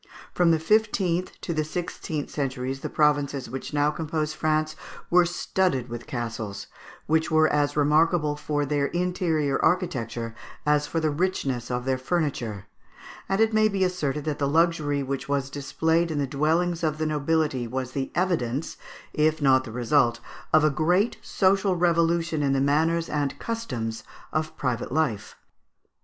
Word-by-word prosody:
From 175 -1 +3
the 165 - +4
fifteenth 185 -1 +1
to 170 - -3
the 155 -1 0
sixteenth 155 -2 -4
centuries, 135 -2 -3
the - - -5
provinces 145 -4 +1
which 135 0 -5
now 145 0 +2
compose 155 0 -2
France 155 0 0 0.4
were 175 0 +5
studded 175 -7 0
with 120 0 -7
castles, 115 -7 -4 0.4
which 160 +1 +1
were 155 -1 +4
as 145 -1 +1
remarkable 150 +1 +3
for 150 0 -1
their 145 0 0
interior, 175 -5 0
architecture 120 - 0 0.3
as 150 0 +2
for 165 - -1
the 155 -1 +1
richness 145 -7 -1
of 125 0 -2
their 130 -1 0
furniture; 130 - -2 0.6
and 195 +1 +1
it 225 0 +3
may 215 0 +5
be 200 -2 0
asserted 150 -6 -1
that 150 -2 -2
the 140 - +1
luxury 150 -2 +2
which 135 +1 -4
was 140 -1 -1
displayed 160 +4 0
in 155 - -2
the 145 - +1
dwellings 160 +5 0
of 155 -1 0
the 155 - -1
nobility 150 -4 0
was 130 +1 -4
the 135 0 -3
evidence, 160 -7 -1 0.4
if 155 +1 +2
not 130 -3 +4
the 115 - -8
resuit, 120 0 +2 0.3
of 155 -1 +5
a 155 - +4
great 175 - +1
social 195 0 +2
revolution 170 -2 +2
in 140 -1 +2
the 135 - +2
manners 160 +4 +2
and 140 -2 -2
customs 120 - -4 0.3
of 155 0 -2
private 125 -4 -2
life. 130 -9 -1
150 Hz, 160 wpm, -25 LUFS, 135-170 Hz, 0.6 s, were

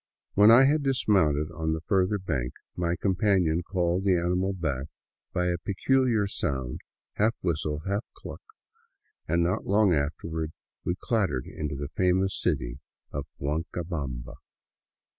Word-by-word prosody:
When 105 +2 +7
I 120 +4 +9
had 150 +3 +3
dismounted 95 - +2
on 80 -1 -1
the 80 - -3
further 95 +3 +2
bank, 70 -10 -2 0.2
my 85 -1 0
companion 90 -3 +2
called 90 0 0
the 95 -2 +3
animal 90 +3 +1
back 75 -8 -2 0.4
by 90 - 0
a 90 -1 0
peculiar 115 +3 +2
sound, 65 -9 -2 0.4
half 110 +3 +3
whistle, 75 -3 -1
half 100 +2 0
cluck, - - -9 0.9
and 85 +2 +2
not 90 +2 -1
long 100 -1 +4
afterward 80 +2 -2 0.3
we 85 - -1
clattered 95 - 0
into 75 -2 -4
the 70 0 -5
famous 95 +1 +2
city - - -1 0.3
of 70 0 -4
Huancabamba. 75 -4 -3
85 Hz, 135 wpm, -27 LUFS, 75-100 Hz, 0.9 s, I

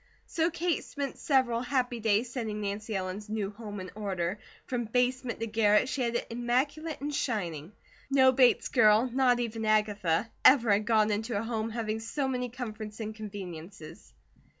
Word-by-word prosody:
So 330 0 0
Kate 345 -1 -1
spent 280 -2 -5
several 260 -6 +2
happy 250 -2 -1
days 220 +2 +1
setting 220 -5 -3
Nancy 210 +1 -3
Ellen's 190 +3 -4
new 210 -2 -2
home 205 -1 -8
in 185 -1 -7
order. 195 -2 -3 0.3
From 245 -2 -2
basement 250 +2 0
to - - 0
garret 215 0 +3
she 270 - -2
had 235 -1 0
it - - -1
immaculate 275 +7 -1
and 295 +1 -3
shining. 180 - -2 0.4
No 265 -1 +6
Bates 255 -2 +4
girl, 220 0 +5
not 250 -2 +3
even 225 -2 -3
Agatha, 210 -3 +1
ever 240 -5 +6
had 205 +1 +2
gone 215 -2 +3
into 220 +1 -1
a 205 - -1
home 225 -1 -2
having 220 -1 -3
so 265 +5 -2
many 250 -1 -2
comforts 220 -3 -7
and 220 -1 -4
conveniences. 180 - -9
225 Hz, 170 wpm, -29 LUFS, 210-250 Hz, 0.4 s, No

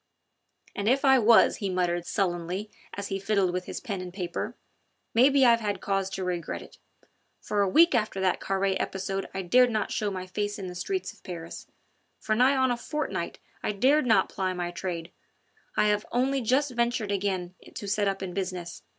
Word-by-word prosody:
"And 200 +2 0
if 270 +3 +2
I 265 -1 +6
was," 230 0 +5
he 200 - -2
muttered 175 -1 0
sullenly 185 +1 -2 0.2
as 200 0 -5
he 195 - -2
fiddled 195 -2 +1
with 180 0 -2
his - - -5
pen 200 -4 -4
and 180 -1 -7
paper, 175 -2 -4 0.6
"maybe 270 +3 +5
I've 235 -1 +6
had 205 -2 -2
cause 195 -1 -1
to 190 - -3
regret 175 -3 -3
it. - - -17 0.6
For 205 - -1
a 200 - +2
week 330 - +6
after 215 -5 0
that 190 -1 +1
Carre 195 0 0
episode 195 0 -3
I 190 0 -4
dared 250 +7 +5
not 215 -2 -1
show 210 - 0
my 185 -2 -5
face 205 +2 -3
in 195 - -6
the 180 - -6
streets 375 - -3
of - - -23
Paris; 170 -3 -8 0.5
for 215 - -1
nigh 255 +5 +4
on 260 -1 +3
a 240 - 0
fortnight 300 +5 -3 0.2
I - - -1
dared 260 +7 +3
not 220 -5 +4
ply 185 -1 -2
my 175 -1 -3
trade... 175 -1 -5 0.7
I - - +4
have 210 0 0
only 265 +2 +1
just 260 +4 +2
ventured 235 -3 0
again 190 -3 -1 0.2
to 205 - -6
set 205 0 +1
up 195 0 -2
in 180 -2 -5
business. 180 -3 -4
200 Hz, 195 wpm, -27 LUFS, 185-235 Hz, 0.7 s, I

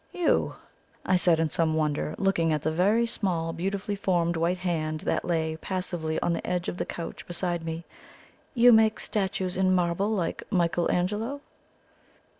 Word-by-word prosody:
"You?" 355 -2 +1 0.5
I 185 - +3
said 175 -2 +3
in 165 - +2
some 160 0 +1
wonder, 150 -1 -1
looking 180 -5 +1
at 150 -1 -1
the 155 - +1
very 205 +8 +3
small, 175 -7 -1
beautifully 195 +3 -2
formed 175 -4 +1
white 170 +2 +1
hand 160 -4 -2
that - - -1
lay 160 -2 -1
passively 175 -3 -3
on 170 - +1
the 165 - -4
edge 180 -1 -1
of - - -3
the - - -2
couch 170 - -6
beside 175 -1 -1
me. 165 +1 -4 0.7
"You 245 0 +7
make 220 -1 +4
statues 190 -3 -2
in 185 0 +3
marble 180 +3 +1
like 195 -6 -1
Michael 175 -3 +1
Angelo?" 215 +10 -1
175 Hz, 165 wpm, -27 LUFS, 165-195 Hz, 0.7 s, You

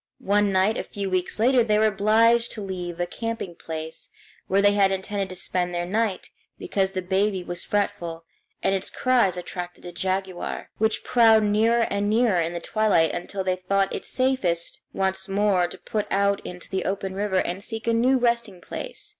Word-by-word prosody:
One 205 0 +2
night 190 +3 +2
a - - -2
few 200 -2 -5
weeks 185 -1 -1
later 245 +2 +4
they 210 -2 +2
were 215 - +4
obliged 220 +3 +3
to 215 - -6
leave 180 -3 -5
a 175 - +1
camping 225 0 -4
place, 160 -1 -6 0.4
where 195 - +2
they 205 0 +5
had 200 -1 +3
intended 195 0 -2
to 185 - -7
spend 180 -1 -2
the 175 0 -1
night, 210 +1 -1 0.3
because 195 -1 -1
the 185 -1 -2
baby 190 +1 0
was 175 0 -5
fretful, 170 -5 -2 0.4
and 195 - +2
its 195 0 -2
cries 240 -8 +2
attracted 180 0 -6
a 175 - -6
jaguar, 190 0 -3
which 220 0 +1
prowled 225 -3 +5
nearer 220 +3 +3
and 200 0 0
nearer 215 -5 +3
in 165 +1 -2
the 170 - -3
twilight 205 -4 +2
until 190 +2 -4
they 185 -1 0
thought 195 +1 0
it - - -4
safest 255 -11 0
once 190 0 -1
more 195 -3 +2
to - - -9
put 210 -2 -3
out 200 0 +2
into 180 0 -8
the 190 -1 -2
open 195 -1 -2
river 200 -1 -1
and 185 +1 -1
seek 225 0 -5
a 230 - +2
new 250 +3 +3
resting 235 -6 0
place. - - -6
195 Hz, 190 wpm, -25 LUFS, 185-215 Hz, 0.4 s, they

